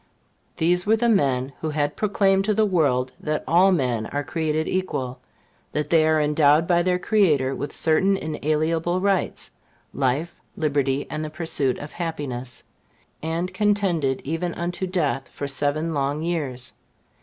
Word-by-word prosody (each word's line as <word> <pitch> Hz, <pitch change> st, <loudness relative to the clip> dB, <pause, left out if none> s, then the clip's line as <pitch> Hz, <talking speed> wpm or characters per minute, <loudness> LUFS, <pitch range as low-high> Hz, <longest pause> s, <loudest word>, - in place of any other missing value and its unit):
These 180 Hz, +3 st, +2 dB
were 220 Hz, -, +5 dB
the 235 Hz, +1 st, +1 dB
men 135 Hz, -, +1 dB
who 160 Hz, -, -2 dB
had 150 Hz, -1 st, -1 dB
proclaimed 195 Hz, -2 st, +2 dB
to 215 Hz, 0 st, +1 dB
the 220 Hz, +1 st, +3 dB
world 140 Hz, -10 st, +1 dB
that 155 Hz, 0 st, -2 dB
all 180 Hz, +4 st, +5 dB
men 125 Hz, -10 st, 0 dB
were 145 Hz, 0 st, -2 dB
created 155 Hz, +1 st, -1 dB
equal; 135 Hz, -9 st, -2 dB, 0.5 s
that 150 Hz, 0 st, -2 dB
they 165 Hz, -2 st, +5 dB
were 155 Hz, 0 st, +3 dB
endowed 150 Hz, +1 st, +4 dB
by 175 Hz, 0 st, +3 dB
their 180 Hz, +1 st, +1 dB
Creator 170 Hz, -10 st, +2 dB
with 145 Hz, +2 st, -4 dB
certain 190 Hz, +5 st, +2 dB
inalienable 160 Hz, +2 st, -1 dB
rights 195 Hz, 0 st, -1 dB, 0.4 s
life, 140 Hz, +6 st, -1 dB, 0.2 s
liberty, 140 Hz, -3 st, 0 dB
and 155 Hz, 0 st, -3 dB
the 155 Hz, -, -4 dB
pursuit 150 Hz, -5 st, -1 dB
of 145 Hz, -, -8 dB
happiness; 135 Hz, -8 st, -5 dB, 0.6 s
and 165 Hz, +3 st, -2 dB
contended 185 Hz, -10 st, +1 dB
even 165 Hz, +4 st, -3 dB
unto 175 Hz, +2 st, -3 dB
death 150 Hz, -7 st, -1 dB
for 140 Hz, -, -5 dB
seven 145 Hz, +4 st, 0 dB
long 145 Hz, +1 st, -1 dB
years. 145 Hz, -7 st, -3 dB
155 Hz, 150 wpm, -23 LUFS, 140-180 Hz, 0.6 s, were